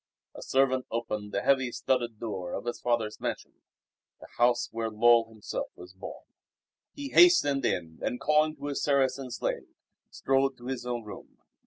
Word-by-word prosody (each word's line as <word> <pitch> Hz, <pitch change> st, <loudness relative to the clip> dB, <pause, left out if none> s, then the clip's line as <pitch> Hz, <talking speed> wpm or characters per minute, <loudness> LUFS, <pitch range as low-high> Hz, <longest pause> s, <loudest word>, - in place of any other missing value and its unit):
A -, -, -10 dB
servant 130 Hz, -1 st, +1 dB
opened 105 Hz, -3 st, -3 dB
the -, -, -2 dB
heavy, 130 Hz, -3 st, +2 dB
studded 120 Hz, -3 st, -1 dB
door 95 Hz, -6 st, -5 dB
of -, -, -4 dB
his 120 Hz, -, -3 dB
father's 115 Hz, -3 st, -1 dB
mansion -, -, -5 dB, 0.6 s
the -, -, -12 dB
house 120 Hz, 0 st, +3 dB
where 115 Hz, 0 st, -2 dB
Lull 115 Hz, +1 st, +4 dB
himself 110 Hz, -2 st, -5 dB
was 90 Hz, +1 st, -12 dB
born. 95 Hz, -, -9 dB, 0.7 s
He 285 Hz, -1 st, -6 dB
hastened 275 Hz, -, +5 dB
in 80 Hz, -2 st, -2 dB
and, 125 Hz, -, -2 dB
calling 155 Hz, 0 st, +2 dB
to 145 Hz, -1 st, -9 dB
his 145 Hz, -1 st, -2 dB
Saracen 135 Hz, -2 st, +1 dB
slave, 120 Hz, -, -3 dB, 0.4 s
strode 135 Hz, 0 st, +1 dB
to 120 Hz, -, -13 dB
his 125 Hz, -1 st, -4 dB
own 120 Hz, -1 st, -3 dB
room. 105 Hz, -2 st, -11 dB
120 Hz, 165 wpm, -28 LUFS, 110-135 Hz, 0.7 s, hastened